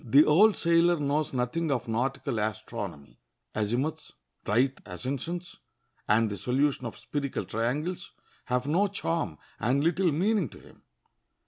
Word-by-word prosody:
The 140 +6 +6
old 200 +8 +5
sailor 170 0 +4
knows 145 +1 0
nothing 130 +6 -1
of 125 -4 -1
nautical 125 +1 -1
astronomy. 105 -8 -5 0.3
Azimuths, 125 +10 -2 0.3
right 130 +5 +3
ascensions, 140 - -5 0.5
and 110 +2 +4
the 100 - -4
solution 130 +5 0
of - - -8
spherical 140 -2 -3
triangles 150 +11 -2 0.4
have 125 0 0
no 175 +8 +3
charm 165 - -2 0.2
and 135 +5 +2
little 170 +2 +2
meaning 190 - +1
to - - -13
him. - - -18
135 Hz, 130 wpm, -28 LUFS, 115-165 Hz, 0.5 s, The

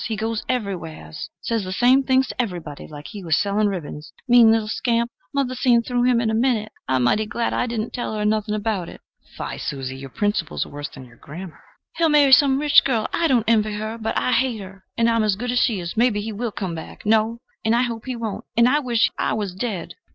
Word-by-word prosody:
He 225 - -2
goes 220 +1 -2
everywheres 170 - -4
says 230 -3 -1
the 185 - -5
same 250 +7 +4
things 260 -1 +2
to - - -1
everybody, 175 -10 -6
like 145 -1 -10
he 205 -3 -8
was 160 -2 +2
selling 205 +1 +1
ribbons. 155 -5 -5 0.2
Mean 240 -2 +7
little 225 -1 +1
scamp! 235 +2 0 0.2
Mother 275 -2 0
seen 240 -2 +3
through 245 0 0
him 250 -2 +4
in 225 -2 0
a - - -2
minute. 220 -2 +1 0.2
I'm 130 -1 +1
mighty 210 - +2
glad 230 +1 -2
I 250 - 0
didn't 230 -1 -3
tell 240 -3 -3
her 210 -1 -1
nothing 215 0 0
about 205 -4 -2
it." - - -11 0.4
[Fie, - - -5
Susie! 135 -2 -4
your 135 0 -8
principles 205 - -1
are - - -12
worse 145 0 -6
than 130 - -11
your 120 -1 -18
grammar.] 170 +4 -10 0.4
"He'll 330 -1 +3
marry 290 -2 +5
some 265 0 +6
rich 290 0 +5
girl 235 -5 0
I 335 - +2
don't 245 -6 +2
envy 215 -2 +3
her, 215 +2 -4
but 220 0 -2
I - - +1
hate 250 -2 +1
her 190 0 -11
and 230 0 +3
I 230 - +3
am 225 - +2
as 210 -2 +2
good 245 +4 -3
as 245 - +2
she 225 -6 +2
is. 170 -1 -5
Maybe 230 -2 +2
he 220 +2 -4
will 230 +2 -3
come 190 -4 -4
back 160 +5 -9
no, 220 +2 +2 0.3
and 220 +1 +2
I 240 - +3
hope 230 -2 -4
he 255 - -2
won't; 225 -3 -4
and 235 +1 +6
I 290 +4 +3
wish 240 -5 +2
I - - +1
was 205 -4 -3
dead!" 190 -2 -4
220 Hz, 240 wpm, -22 LUFS, 195-245 Hz, 0.4 s, Mean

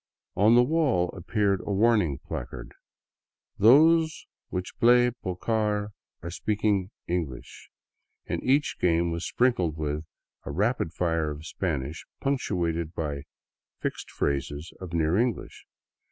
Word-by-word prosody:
On 110 +4 +5
the 120 - +7
wall 130 - +1
appeared 100 +1 0
a - - -4
warning 100 - +3
placard, - - -7 0.4
" - - -58
Those 160 +8 +5 0.2
which 90 0 -4
play 120 +1 +5
pocar 105 0 -1 0.3
are 85 - -5
speaking 100 0 0 0.2
English," 85 -8 -4 0.6
and - - -3
each 140 +3 +1
game 85 -1 +2
was 85 +1 -3
sprinkled 95 -11 +1
with 75 0 -2 0.4
a - - -7
rapid 105 -4 0
fire 80 -3 0
of 75 +1 -7
Spanish, 80 -4 -3 0.2
punctuated 85 - -1
by 75 -3 -3 0.5
fixed - - -4
phrases 70 +3 -2
of 90 -3 -8
near 80 0 +1
English. 120 -1 -2
90 Hz, 125 wpm, -27 LUFS, 80-115 Hz, 0.6 s, the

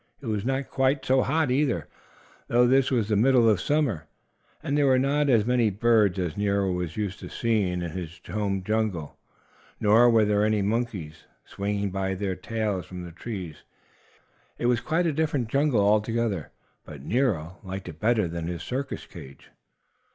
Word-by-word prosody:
It 140 - -12
was 105 -3 -2
not 135 +2 -2
quite 135 +1 +1
so 130 0 +3
hot, 155 0 +1
either, 125 - 0 0.6
though 120 +1 +4
this 130 +2 +3
was 115 -6 +1
the 105 - +1
middle 120 +2 +4
of 105 -5 +3
summer, 130 - 0 0.6
and 140 - -1
there 145 -1 +3
were 130 -1 +4
not 140 +2 +1
as 115 -5 +4
many 120 -2 +2
birds 105 -2 +2
as 90 -4 -2
Nero 100 -2 0
was 90 -1 -3
used 105 -3 -3
to - - -8
seeing 100 -7 0
in 85 - -4
his 85 0 -7
home 100 -3 -2
jungle. 105 -7 -2 0.6
Nor 110 +4 +5
were 115 -2 +4
there 105 0 +2
any 105 -1 +1
monkeys 100 -8 -3 0.2
swinging 100 0 -3
by 95 0 -2
their 95 -1 -2
tails 105 -2 -3
from 90 -1 -8
the 85 - -8
trees. 90 -4 -7 1.0
It - - -3
was 120 -1 +2
quite 170 +3 0
a 160 - +1
different 145 -6 -1
jungle 140 -3 +2
altogether, 105 -3 +1 0.3
but 70 -3 -11
Nero 95 - -1
liked 95 -1 -7
it 80 - -9
better 110 -2 +2
than 85 0 -5
his 85 0 -5
circus 135 +2 -4
cage. 70 0 -13
105 Hz, 175 wpm, -26 LUFS, 95-125 Hz, 1.0 s, Nor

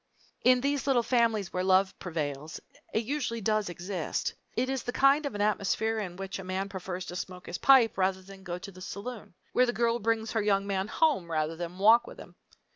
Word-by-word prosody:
In 250 0 +5
these 285 +1 -1
little 250 -3 +3
families 225 -6 +1
where 180 - -1
love 190 +1 +3
prevails 155 -3 -4 0.3
it 220 - 0
usually 255 -3 -2
does 215 -1 0
exist. 175 -1 -3 0.2
It 250 +2 +1
is 265 -1 -1
the 245 - -4
kind 275 +3 +4
of 230 - -6
an 205 - -2
atmosphere 215 +2 +1
in 185 -4 -5
which 195 +1 -5
a - - -6
man 190 +2 -3
prefers 185 -1 -5
to 180 - -7
smoke 180 0 -6
his 175 - -5
pipe 250 -7 +5
rather 190 0 +1
than 195 0 -13
go 175 -2 -5
to 195 +2 -9
the 185 0 -14
saloon; 205 0 -7 0.2
where 250 - +4
the 240 - 0
girl 235 0 +1
brings 225 0 0
her 220 - +1
young 200 -1 +2
man 195 -1 -1
home 275 - +1
rather 155 0 -1
than 175 +1 -6
walk 220 +5 +5
with - - -10
him. - - -12
200 Hz, 215 wpm, -29 LUFS, 185-235 Hz, 0.3 s, In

